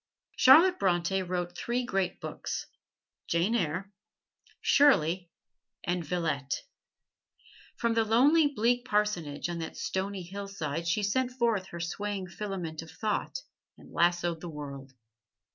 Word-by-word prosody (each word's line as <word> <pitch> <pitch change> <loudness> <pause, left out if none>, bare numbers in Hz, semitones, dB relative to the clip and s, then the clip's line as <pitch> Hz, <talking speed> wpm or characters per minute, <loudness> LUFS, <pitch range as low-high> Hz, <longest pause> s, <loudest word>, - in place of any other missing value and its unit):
Charlotte 340 +8 +7
Bronte 185 0 +1
wrote 175 -1 -3
three 240 +5 -1
great 195 -6 -1
books: - - -5 0.6
"Jane 170 +7 +1
Eyre," 185 -1 -1 0.7
"Shirley" 180 - +4 0.5
and 175 0 -1
"Villette." 155 -4 -2 1.1
From 235 -1 +1
the 225 0 +3
lonely, 280 +8 +5
bleak 245 -2 +1
parsonage 210 - 0
on 170 -1 -4
that 160 - -6
stony 190 0 -2
hillside 175 -4 -4
she 190 +5 +1
sent 250 +5 +1
forth 235 -6 0
her 170 - -8
swaying 200 +3 -3
filament 180 -5 -5
of 165 - -11
thought 220 - -2 0.3
and - - -16
lassoed 175 -1 +1
the 175 - -6
world. 140 -3 -8
190 Hz, 125 wpm, -29 LUFS, 170-225 Hz, 1.1 s, Charlotte